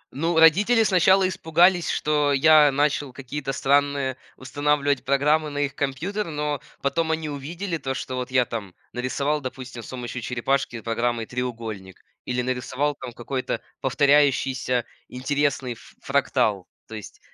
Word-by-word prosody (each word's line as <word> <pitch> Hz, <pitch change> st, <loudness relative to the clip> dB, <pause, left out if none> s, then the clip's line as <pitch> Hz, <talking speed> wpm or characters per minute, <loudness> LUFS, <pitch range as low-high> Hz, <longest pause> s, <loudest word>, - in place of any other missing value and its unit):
Ну, 165 Hz, +4 st, 0 dB
родители 205 Hz, +9 st, +5 dB
сначала 190 Hz, -1 st, +4 dB
испугались, 175 Hz, 0 st, +3 dB
что 150 Hz, -1 st, +1 dB
я 150 Hz, +1 st, +6 dB
начал 145 Hz, 0 st, 0 dB
какие-то 135 Hz, +2 st, -5 dB
странные 140 Hz, -1 st, +1 dB, 0.2 s
устанавливать 145 Hz, +1 st, 0 dB
программы 150 Hz, +3 st, +2 dB
на 145 Hz, -, -7 dB
их 145 Hz, -1 st, -1 dB
компьютер. 165 Hz, +10 st, -2 dB
Но 150 Hz, -2 st, -2 dB, 0.2 s
потом 160 Hz, +4 st, 0 dB
они 160 Hz, -1 st, -2 dB
увидели 165 Hz, +6 st, -4 dB
то, 135 Hz, -3 st, -4 dB
что 130 Hz, -, -5 dB
вот 125 Hz, -1 st, -4 dB
я 130 Hz, -1 st, +3 dB
там 100 Hz, -6 st, -6 dB, 0.2 s
нарисовал, 140 Hz, +4 st, -1 dB
допустим, 130 Hz, -2 st, -7 dB
с -, -, -11 dB
помощью 125 Hz, -1 st, -5 dB
черепашки 125 Hz, 0 st, -1 dB
программой 115 Hz, +1 st, -1 dB
треугольник 115 Hz, -6 st, -5 dB, 0.3 s
или 125 Hz, 0 st, -1 dB
нарисовал 130 Hz, +3 st, -1 dB
там -, -, -6 dB
какой-то 130 Hz, +2 st, -3 dB, 0.2 s
повторяющийся 135 Hz, -3 st, +2 dB, 0.2 s
интересный 140 Hz, 0 st, -1 dB
ф 115 Hz, -, -17 dB
фрактал. 100 Hz, -4 st, +1 dB, 0.2 s
То -, -, -11 dB
есть, 105 Hz, -, -10 dB
140 Hz, 140 wpm, -24 LUFS, 125-150 Hz, 0.3 s, я